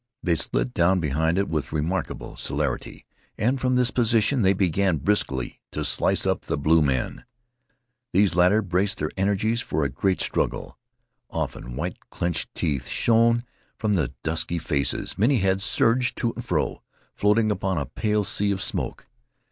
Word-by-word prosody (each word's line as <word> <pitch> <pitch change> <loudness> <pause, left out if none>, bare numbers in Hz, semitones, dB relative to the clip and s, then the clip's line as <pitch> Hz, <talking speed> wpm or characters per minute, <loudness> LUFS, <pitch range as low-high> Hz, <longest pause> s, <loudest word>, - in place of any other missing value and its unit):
They 90 - +2
slid - - -1
down 90 +2 +3
behind 80 +2 0
it 100 - +1
with 75 -3 -2
remarkable 80 +5 -3
celerity, 70 -3 -3 0.3
and 125 +5 0
from 125 0 +2
this 125 0 +3
position 115 +2 +2
they 95 -1 +4
began 95 -1 +1
briskly 70 -8 -1
to - - -2
slice - - +1
up - - +1
the - - -2
blue 80 +3 +4
men. 65 -4 -1 0.9
These 100 +1 +3
latter 90 +5 +4
braced 95 +3 0
their - - -2
energies 100 +4 +1
for 80 -8 -1
a - - 0
great 95 +8 0
struggle. - - -2 0.5
Often, - - -4
white - - -4
clinched 85 -1 -3
teeth 70 -5 -1
shone 115 +1 +3 0.3
from 110 -2 0
the 75 -10 0
dusky 80 +2 -1
faces. 70 -1 -1
Many 125 +6 +4
heads 95 -1 +1
surged 115 +4 +2
to 115 -2 -1
and - - -7
fro, - - -1 0.3
floating 105 +1 +2
upon 95 -2 -1
a 70 - -1
pale 105 -1 0
sea 105 -1 0
of 95 - -1
smoke. - - -2
95 Hz, 160 wpm, -24 LUFS, 80-110 Hz, 0.9 s, they